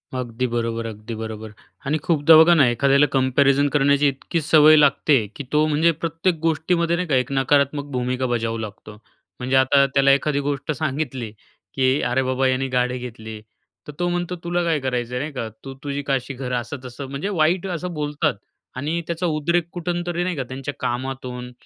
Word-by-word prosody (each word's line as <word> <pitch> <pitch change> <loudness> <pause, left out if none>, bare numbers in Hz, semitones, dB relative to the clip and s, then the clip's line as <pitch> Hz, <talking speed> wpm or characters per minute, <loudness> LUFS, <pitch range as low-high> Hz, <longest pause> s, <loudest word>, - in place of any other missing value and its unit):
अगदी 125 0 -3
बरोबर, 115 -1 -2
अगदी 110 +1 -7
बरोबर. 110 -1 -7 0.4
आणि 155 +2 +1
खूपदा 160 -1 +5
बघा 160 +2 +7
ना, 150 -6 +5
एखाद्याला 140 +4 +3
कम्पॅरिझन 135 +2 +3
करण्याची 140 0 +3
इतकी 140 +5 -2
सवय 155 0 +6
लागते, 145 -4 +3
की 145 - -6
तो 150 0 +3
म्हणजे 155 +2 +3
प्रत्येक 165 +2 -1
गोष्टीमध्ये 170 +1 +1
नाही 180 0 -2
का, 140 - +1
एक 125 0 0
नकारात्मक 140 +1 +1
भूमिका 125 0 -1
बजावू 115 -2 -1
लागतो. 105 -1 -8 0.5
म्हणजे 130 +1 -1
आता 135 +1 +5
त्याला 140 0 +5
एखादी 140 +1 +1
गोष्ट 145 +1 -2
सांगितली, 135 -5 -3 0.4
की 130 +1 +2
अरे 125 +2 +1
बाबा 130 +1 +1
याने 130 +1 0
गाडी 125 -1 0
घेतली, 110 -3 -8 0.5
तर - - -6
तो 175 - +1
म्हणतो, 175 0 -2
"तुला 175 0 -1
काय 165 -3 +1
करायचं 125 -2 -3
आहे? - - -1
नाही 150 - -4
का? 115 -4 -4 0.2
तू 135 0 -7
तुझी 140 0 -3
काशी 135 -1 -2
कर." 130 -2 -5
असं 120 +3 -3
तसं, 125 +2 -7
म्हणजे 140 +8 -4
वाईट 175 0 +1
असं 180 0 -4
बोलतात. 150 -1 -1 0.4
आणि 155 +6 -2
त्याचा 170 +1 -2
उद्रेक 170 +1 0
कुठून 175 0 -3
तरी 175 0 -1
नाही 180 -2 -2
का 135 - -2
त्यांच्या 135 +2 -5
कामातून, 125 0 -4
140 Hz, 185 wpm, -22 LUFS, 125-155 Hz, 0.5 s, बघा